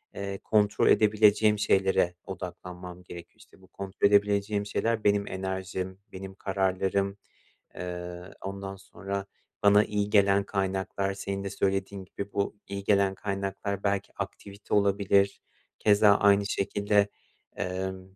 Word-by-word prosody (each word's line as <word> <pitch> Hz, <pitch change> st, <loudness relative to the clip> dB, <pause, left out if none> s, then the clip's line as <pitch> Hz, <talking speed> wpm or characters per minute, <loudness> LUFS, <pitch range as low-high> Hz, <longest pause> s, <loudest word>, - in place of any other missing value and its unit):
eee, 100 Hz, 0 st, -4 dB
kontrol 105 Hz, -1 st, +2 dB
edebileceğim 105 Hz, 0 st, +4 dB
şeylere 95 Hz, -3 st, +2 dB
odaklanmam 90 Hz, -1 st, -8 dB
gerekiyor. 85 Hz, -1 st, -11 dB
İşte, -, -, -20 dB
bu 95 Hz, -, -18 dB
kontrol 100 Hz, +1 st, 0 dB
edebileceğim 100 Hz, 0 st, +2 dB
şeyler 115 Hz, +1 st, -1 dB
benim 100 Hz, 0 st, +2 dB
enerjim, 95 Hz, 0 st, -4 dB
benim 95 Hz, 0 st, -8 dB
kararlarım, 95 Hz, 0 st, 0 dB, 0.6 s
eee, 90 Hz, 0 st, -6 dB, 0.2 s
ondan 95 Hz, 0 st, -5 dB
sonra 100 Hz, 0 st, -6 dB, 0.4 s
bana 105 Hz, +1 st, +6 dB
iyi 105 Hz, -1 st, -1 dB
gelen 100 Hz, -1 st, +4 dB
kaynaklar. 95 Hz, 0 st, -2 dB
Senin 100 Hz, 0 st, -4 dB
de 100 Hz, -, -3 dB
söylediğin 95 Hz, 0 st, -2 dB
gibi, 100 Hz, +2 st, -7 dB
bu 100 Hz, +1 st, -1 dB
iyi 100 Hz, 0 st, -5 dB
gelen 100 Hz, -1 st, +3 dB
kaynaklar 100 Hz, 0 st, -3 dB
belki 100 Hz, -1 st, -1 dB
aktivite 100 Hz, +1 st, -7 dB
olabilir, 100 Hz, -1 st, +3 dB, 0.4 s
keza 105 Hz, -1 st, +5 dB
aynı 100 Hz, 0 st, +4 dB
şekilde, 100 Hz, 0 st, +1 dB, 0.5 s
emm, 95 Hz, +1 st, -4 dB
100 Hz, 120 wpm, -28 LUFS, 95-100 Hz, 0.6 s, bana